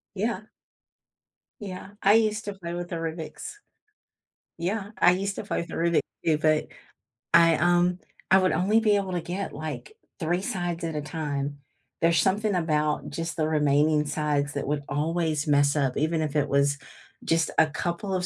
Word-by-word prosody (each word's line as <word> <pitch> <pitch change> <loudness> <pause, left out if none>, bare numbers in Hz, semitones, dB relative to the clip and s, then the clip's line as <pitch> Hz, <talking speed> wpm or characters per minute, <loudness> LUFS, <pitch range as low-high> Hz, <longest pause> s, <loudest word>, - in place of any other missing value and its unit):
Yeah. 215 0 -2 1.2
Yeah. 195 -1 -7
I 200 - +6
used 215 -1 +2
to 205 - -4
play 170 -3 -7
with 175 0 -5
the 170 - -3
Rubik's 165 - -6 1.0
Yeah, 195 +4 -2
I 180 - +6
used 195 +2 -2
to - - -5
play - - -2
with - - -10
Rubik 170 0 +2 0.2
too, 155 -2 +3
but 155 0 +2 0.7
I, 165 -1 +7
um, 175 +2 +2 0.3
I 190 - +8
would 185 -1 +2
only 210 +5 +3
be 215 -2 +3
able 195 -2 -1
to 175 - -1
get, 180 +4 -4
like, 155 - -6 0.3
3 175 +1 0
sides 175 -3 -3
at 160 -2 -3
a 150 - -1
time. 145 -2 -4 0.4
There's 165 -1 +4
something 205 +5 +1
about 155 -3 0
just 165 +1 -4
the 155 - +1
remaining 150 0 +3
sides 145 -1 -1
that 140 -1 -3
would 145 0 -1
always 155 +1 -1
mess 145 0 +3
up, 135 -4 +1
even 160 +2 +1
if 155 -1 -3
it 145 -1 +1
was 140 +1 +2 0.5
just 165 0 +1
a 160 - +6
couple 175 +5 -3
of 180 -1 0
165 Hz, 175 wpm, -26 LUFS, 150-185 Hz, 1.2 s, I